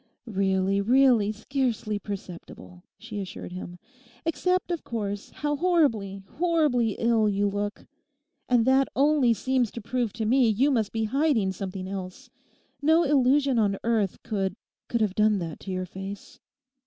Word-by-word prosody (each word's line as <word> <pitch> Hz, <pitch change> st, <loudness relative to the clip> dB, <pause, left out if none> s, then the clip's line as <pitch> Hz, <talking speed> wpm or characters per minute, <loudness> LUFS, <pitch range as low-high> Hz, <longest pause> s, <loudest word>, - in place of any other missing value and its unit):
'Really, 195 Hz, -2 st, +1 dB
really, 240 Hz, -2 st, +4 dB
scarcely 220 Hz, -2 st, -2 dB
perceptible,' 170 Hz, -, -9 dB, 0.2 s
she 220 Hz, -2 st, -7 dB
assured 185 Hz, -1 st, -7 dB
him, 180 Hz, -1 st, -7 dB, 0.5 s
'except, 360 Hz, +3 st, 0 dB
of 340 Hz, -, -3 dB
course, 205 Hz, -3 st, -4 dB
how 295 Hz, 0 st, -2 dB
horribly, 255 Hz, -, +1 dB, 0.2 s
horribly 300 Hz, -, +2 dB
ill 230 Hz, -2 st, +2 dB
you 205 Hz, 0 st, +1 dB
look. 205 Hz, +1 st, -3 dB, 0.6 s
And 240 Hz, -2 st, +4 dB
that 265 Hz, +1 st, +4 dB
only 280 Hz, -4 st, +3 dB
seems 255 Hz, +2 st, 0 dB
to -, -, -5 dB
prove 235 Hz, 0 st, -2 dB
to 220 Hz, -1 st, -3 dB
me 245 Hz, +1 st, +4 dB
you 255 Hz, +7 st, +2 dB
must 225 Hz, -6 st, 0 dB
be 225 Hz, -1 st, -1 dB
hiding 255 Hz, -4 st, +1 dB
something 190 Hz, 0 st, -5 dB
else. 190 Hz, -1 st, -7 dB, 0.5 s
No 320 Hz, +3 st, +4 dB
illusion 275 Hz, -2 st, +3 dB
on 200 Hz, -2 st, +1 dB
earth 220 Hz, -5 st, 0 dB
could—could 205 Hz, +3 st, -4 dB
have 210 Hz, -3 st, +1 dB
done 210 Hz, 0 st, +3 dB
that 165 Hz, -4 st, -5 dB
to 195 Hz, -, -7 dB
your 185 Hz, 0 st, -2 dB
face. 195 Hz, +2 st, -9 dB
220 Hz, 145 wpm, -26 LUFS, 195-265 Hz, 0.6 s, really